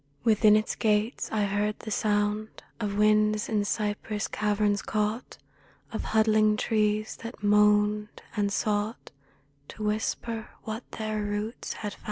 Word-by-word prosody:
Within 215 -2 +5
its 215 +1 +1
gates 215 +2 0
I 215 -1 +1
heard 205 +1 0
the 215 - -8
sound 210 +1 0 0.2
Of 205 -2 -2
winds 215 0 +3
in 210 -2 +1
cypress 210 0 -2
caverns 210 -1 +1
caught 215 +3 -2 0.6
Of - - -3
huddling 215 -1 +3
trees 215 -1 0
that 230 -1 -9
moaned, 210 0 +3
and 205 -2 +1
sought 210 +2 -1 0.6
To 215 - -8
whisper 220 +1 -2
what 220 +2 -6
their 215 -1 -2
roots 205 +2 -3
had 210 -2 -5
found. - - -16
210 Hz, 135 wpm, -27 LUFS, 210-215 Hz, 0.6 s, Within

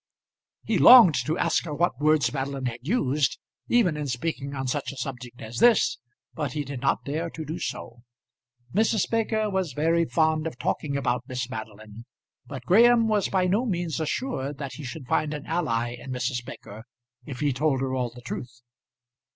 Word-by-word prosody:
He - - 0
longed 240 -9 +9
to 160 +2 0
ask - - +1
her 150 -3 -4
what 155 -6 0
words 150 -5 +3
Madeline 135 -1 -3
had 120 -1 -3
used, 145 - 0 0.3
even 220 -10 +3
in 150 -1 -3
speaking 140 +2 -3
on 135 -1 -3
such 135 +2 -2
a 140 - -11
subject 125 -2 -6
as 115 +2 -6
this; 235 - +4 0.3
but 145 -5 -3
he 150 - -2
did 135 -2 -6
not 135 - 0
dare 160 +4 -2
to 160 -1 -7
do 160 +4 -5
so. 120 +1 -6 0.7
Mrs. 220 0 +2
Baker 220 -1 0
was 190 -7 -1
very 165 +4 +2
fond 160 -1 +1
of 145 - -7
talking 140 +1 -2
about 125 -2 -1
Miss 125 -1 -3
Madeline, 110 -1 -9 0.4
but 130 -3 -8
Graham 230 - +5
was 210 -3 +1
by 185 -2 +1
no 200 +6 +2
means 175 - -2
assured 155 - -3
that 140 -2 -6
he 150 - -9
should 135 +2 -7
find 150 +4 0
an 150 - -7
ally 150 -9 -1
in 125 - -10
Mrs. 125 -1 -2
Baker 110 -2 -10 0.4
if 135 -3 -7
he 145 -2 +1
told 135 0 +1
her 130 -1 -2
all 125 -2 -1
the 120 +1 -13
truth. 120 0 -7
145 Hz, 185 wpm, -26 LUFS, 125-170 Hz, 0.7 s, longed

